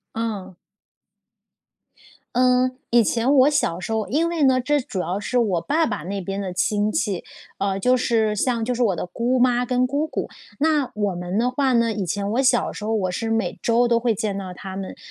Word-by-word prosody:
嗯。 205 -5 -4 1.8
嗯， 255 0 +3 0.2
以 235 -1 +5
前 235 +6 +1
我 275 0 +6
小 235 - 0
时 185 - -5
候 220 -2 -1
因 310 - +1
为 335 -2 -2
呢， 260 -1 +4
这 290 +2 +1
主 195 -6 -5
要 180 +2 -2
是 245 +4 -2
我 195 -8 +1
爸 315 - +1
爸 - - -3
那 195 +3 -4
边 195 +2 -4
的 190 -2 -4
亲 205 +3 0
戚， 205 -5 -1 0.4
呃， 195 0 -1
就 250 +6 +3
是 220 -3 +1
像 230 +1 0
就 250 - -1
是 245 - -3
我 200 -6 +2
的 - - -3
姑 240 +7 -1
妈 245 0 +3
跟 250 0 +2
姑 285 +4 -1
姑， - - -3 0.3
那 300 -3 +2
我 205 -2 0
们 180 +3 -4
的 245 +2 +1
话 265 0 +1
呢， 230 -1 +2
以 205 - -2
前 200 +3 -2
我 245 - +2
小 255 -2 +2
时 210 - -8
候 220 - -2
我 185 -3 0
是 225 +5 -3
每 225 -5 -1
周 240 +1 +3
都 235 -1 +3
会 230 -2 +1
见 205 0 -2
到 195 -2 -5
她 190 +1 -8
们， 190 0 -6
225 Hz, 230 characters per minute, -22 LUFS, 195-250 Hz, 1.8 s, 我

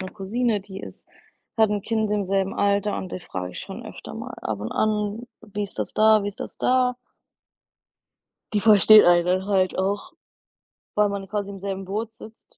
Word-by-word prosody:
'ne 185 0 -6
Cousine, 215 +2 -1
die 195 0 -9
ist - - -11 0.5
hat 220 -1 +5
'n 205 -2 -1
Kind 220 -2 -1
im 205 -2 0
selben 195 0 0
Alter 200 0 +1
und 185 - -6
die 185 - -4
frage 90 - -6
ich - - -8
schon - - -8
öfter - - -9
mal - - -7
ab 105 -2 -3
und 105 - -4
an: 210 +1 -1 0.2
„Wie 210 -1 -5
ist 200 - -7
das - - -3
da, 215 -1 +5
wie 205 - -2
ist 200 - -10
das - - -7
da?” 250 0 +2 1.6
Die 205 - +3
versteht 215 -1 +7
einen 175 -1 +5
dann 185 +2 0
halt 185 -2 +1
auch, 200 +2 -1 0.8
weil 210 -1 +3
man 200 -1 -5
quasi 205 0 -3
im 195 -1 -8
selben 195 0 -4
Boot 215 +4 -4
sitzt. 225 0 -15
200 Hz, 195 wpm, -24 LUFS, 190-215 Hz, 1.6 s, versteht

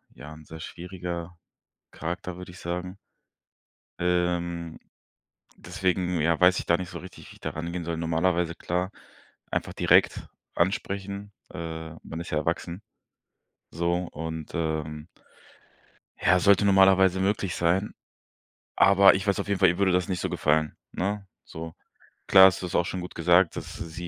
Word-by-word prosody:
ja, 75 - -10
ein 80 0 -14
sehr 80 +1 -10
schwieriger 85 -1 -6 0.5
Charakter, 90 +1 -5
würde 90 -1 -9
ich 90 - -13
sagen. 90 +2 -5 1.0
Ähm, 85 -1 -1 0.8
deswegen 90 -1 -1
ja, 80 +1 +2
weiß 90 0 +5
ich - - -4
gar 85 - +4
nicht 90 -1 -6
so - - -7
richtig, 95 - -12
wie - - -13
ich - - -20
da - - -3
rangehen 85 +2 -5
soll. 85 -1 -3
Normalerweise 85 +1 0
klar 90 +3 -2 0.6
einfach - - -2
direkt - - +3 0.3
ansprechen, 100 +2 -2 0.2
äh, 80 -2 -6
man 80 +1 -7
ist 85 - -7
ja - - 0
erwachsen. 90 +5 -3 0.9
So 85 +1 0 0.2
und 80 0 -6
ähm 80 -1 -3 1.1
ja, 90 - +4
sollte 100 +1 +4
normalerweise 95 -1 +5
möglich 95 -2 0
sein. 90 +4 +1 0.8
Aber 100 0 +7
ich 95 +1 -2
weiß 100 - +1
auf - - -5
jeden 100 -1 0
Fall, 95 - +7
ihr 85 +2 0
würde 100 -2 +3
das 90 0 +1
nicht 90 -2 -2
so - - -1
gefallen, 75 +1 +1 0.2
ne, 100 +1 -2 0.2
so. 80 0 -8 0.5
Klar 95 0 +9
ist 95 - -1
das 90 - -5
auch 85 - +3
schon 95 - -4
gut 90 - -8
gesagt, 85 +1 +3
dass - - -7
sie 85 +1 -7
90 Hz, 155 wpm, -26 LUFS, 85-95 Hz, 1.1 s, Klar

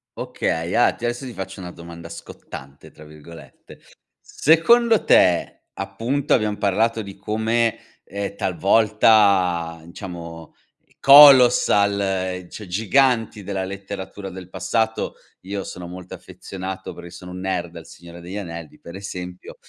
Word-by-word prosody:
Okay, 85 +2 -3
ah 120 - +3
t - - -15
adesso 120 +3 -3
ti 125 - -7
faccio 95 -1 -7
una 90 -1 -7
domanda 85 -1 -11
"scottante", 70 0 -11
tra 75 0 -16
virgolette: 75 -2 -14 0.4
secondo 225 - +3
te 90 -1 +3
appunto, 115 +9 -2
abbiam 105 -2 +1
parlato 110 +3 0
di 100 -1 -10
come, 110 +3 0 0.3
ehm, 100 0 -6
talvolta, 95 -3 +2
diciamo, 85 -4 -9 0.4
colossal, 100 -9 +6
cioè 105 - -9
giganti 115 +2 +1
della 95 0 -3
letteratura 95 0 -7
del 90 -1 -10
passato 110 +3 -2 0.3
io 100 +1 -5
sono 90 -1 -8
molto 90 +1 -9
affezionato 95 0 -8
perché 85 0 -11
sono 90 +1 -11
un 90 - -7
nerd 90 -2 -3
del 85 -1 -11
Signore 85 0 -13
degli 90 +3 -9
Anelli, 85 -5 -8
per 85 - -11
esempio, 90 -2 -8
95 Hz, 130 wpm, -21 LUFS, 85-110 Hz, 0.4 s, colossal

